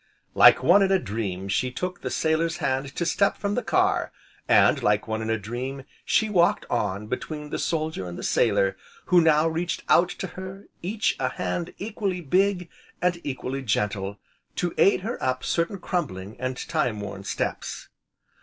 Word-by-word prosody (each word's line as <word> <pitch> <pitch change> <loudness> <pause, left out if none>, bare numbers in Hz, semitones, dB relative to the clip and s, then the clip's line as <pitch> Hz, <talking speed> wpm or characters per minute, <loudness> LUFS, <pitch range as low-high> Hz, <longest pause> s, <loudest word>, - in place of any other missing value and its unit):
Like 130 - +7
one 180 +8 +6
in 195 -1 +3
a 195 - +5
dream 100 - -4
she 115 +6 0
took 180 +8 -4
the - - -3
sailor's 160 +1 0
hand 135 +1 -2
to 170 - -1
step 200 +4 +2
from 200 0 -2
the - - 0
car, - - +1 0.4
and - - +5
like 105 +1 +1
one 110 0 -2
in 110 - -3
a 110 - +1
dream, 125 +6 -5 0.2
she 220 - +2
walked 175 -5 +2
on 105 -3 -1
between 150 +6 -5
the - - -2
soldier 155 - -2
and 85 - -7
the - - -7
sailor, 100 -4 +2 0.4
who 175 - +8
now 160 -1 +4
reached 170 +2 -2
out 175 +1 +5
to - - -5
her, 190 +1 -8 0.2
each, 205 +5 0
a - - +1
hand 175 -1 -3
equally 200 -3 -3
big 180 +3 +1 0.3
and 180 -1 0
equally 135 -1 -4
gentle, 100 -3 -1 0.4
to 175 -1 -1
aid 195 -1 +5
her 225 +5 -4
up 130 0 -1
certain 170 +4 0
crumbling, 110 - -3
and 130 0 -3
time 110 -4 0
worn 100 -1 -6
steps. 100 - -4
150 Hz, 175 wpm, -25 LUFS, 110-180 Hz, 0.4 s, who